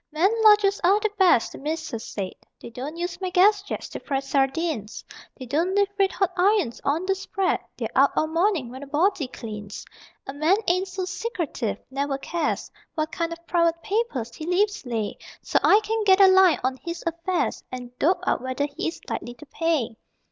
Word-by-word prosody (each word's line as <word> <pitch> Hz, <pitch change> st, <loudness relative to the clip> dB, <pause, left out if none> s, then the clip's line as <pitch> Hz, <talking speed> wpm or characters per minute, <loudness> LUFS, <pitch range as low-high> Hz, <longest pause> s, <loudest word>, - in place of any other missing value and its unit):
_ -, -, -57 dB
II 305 Hz, 0 st, -11 dB
Men 390 Hz, -, +6 dB
lodgers 415 Hz, -2 st, +6 dB
are 390 Hz, +4 st, +5 dB
the 430 Hz, 0 st, -1 dB
best, 355 Hz, -12 st, +4 dB
the -, -, -10 dB
Mrs. 310 Hz, -5 st, -4 dB
said: 195 Hz, -4 st, -5 dB, 0.3 s
They -, -, -10 dB
don't 270 Hz, +7 st, -6 dB
use 350 Hz, +1 st, -4 dB
my 370 Hz, -, -1 dB
gas 395 Hz, +3 st, +4 dB
jets 405 Hz, -, -5 dB
to -, -, -6 dB
fry 275 Hz, -3 st, -2 dB
sardines, 270 Hz, -3 st, -1 dB, 0.3 s
They 260 Hz, -, -8 dB
don't 330 Hz, +9 st, 0 dB
leave 405 Hz, -1 st, +3 dB
red 390 Hz, -1 st, +3 dB
hot 385 Hz, -2 st, 0 dB
irons 375 Hz, -, +2 dB
on 310 Hz, +6 st, 0 dB
the 385 Hz, -, +2 dB
spread, 385 Hz, 0 st, -1 dB, 0.2 s
They're -, -, -2 dB
out -, -, +6 dB
all -, -, +2 dB
morning, 330 Hz, -, 0 dB
when 260 Hz, +2 st, -9 dB
a 285 Hz, -, -8 dB
body 310 Hz, +1 st, +1 dB
cleans. 210 Hz, -4 st, -8 dB, 0.4 s
A 270 Hz, -, -6 dB
man 310 Hz, +7 st, +3 dB
ain't 365 Hz, +2 st, +2 dB
so 370 Hz, 0 st, -4 dB
secretive, 340 Hz, -, -3 dB
never 275 Hz, 0 st, -1 dB
cares 325 Hz, +3 st, -2 dB, 0.2 s
What 310 Hz, -1 st, -1 dB
kind 335 Hz, 0 st, -2 dB
of 335 Hz, 0 st, -8 dB
private 335 Hz, -1 st, +2 dB
papers 385 Hz, -, -2 dB
he 310 Hz, -, -7 dB
leaves 395 Hz, -3 st, +1 dB
lay, 225 Hz, -3 st, -3 dB, 0.2 s
So -, -, +2 dB
I 410 Hz, -, +6 dB
can 445 Hz, +1 st, -1 dB
get 385 Hz, -1 st, +5 dB
a 395 Hz, -, +9 dB
line 375 Hz, -2 st, +6 dB
on 260 Hz, +1 st, 0 dB
his 335 Hz, +4 st, -6 dB
affairs 335 Hz, +2 st, -1 dB
And 250 Hz, -1 st, -8 dB
dope 355 Hz, +3 st, +2 dB
out -, -, +1 dB
whether 260 Hz, +2 st, -1 dB
he 350 Hz, -, -2 dB
is 330 Hz, -, -4 dB
likely 240 Hz, 0 st, -5 dB
pay. 315 Hz, -10 st, 0 dB
335 Hz, 200 wpm, -24 LUFS, 270-380 Hz, 0.4 s, a